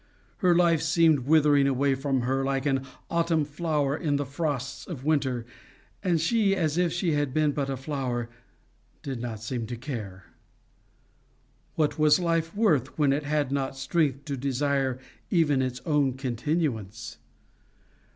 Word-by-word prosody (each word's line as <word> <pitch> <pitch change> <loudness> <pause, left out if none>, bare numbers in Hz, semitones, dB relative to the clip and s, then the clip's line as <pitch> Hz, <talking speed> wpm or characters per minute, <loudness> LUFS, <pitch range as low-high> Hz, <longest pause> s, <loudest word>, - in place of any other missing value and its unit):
Her 180 -4 +3
life 170 -3 +4
seemed 160 -4 +3
withering 145 -2 +5
away 135 +1 +2
from 135 -1 -1
her, 135 +2 0
like 135 0 -1
an 135 -1 0 0.2
autumn 165 -2 +1
flower 150 -2 -1
in 150 -3 -1
the 145 0 -1
frosts 140 -2 -3
of 145 -7 -7
winter; 135 -6 0 0.6
and 175 -4 +2
she, 200 +3 +2
as 160 -5 0
if 175 -1 +2
she 175 0 0
had 145 -3 -1
been 155 -1 +3
but 140 -1 -2
a 135 - -2
flower, 130 -4 -3 0.8
did 130 -4 -4
not 110 -3 -5
seem 115 -1 -3
to 120 - -4
care. 110 -8 -6 1.5
What 155 0 0
was 155 +3 +5
life 165 -1 0
worth, 155 - +1
when 145 -3 +3
it 145 +1 -2
had 145 -2 0
not 135 -1 -2
strength 140 0 0
to 140 - -3
desire 135 0 0 0.3
even 150 -7 +3
its 125 -1 -3
own 145 -4 +2
continuance? 120 - -3
140 Hz, 150 wpm, -27 LUFS, 130-160 Hz, 1.5 s, withering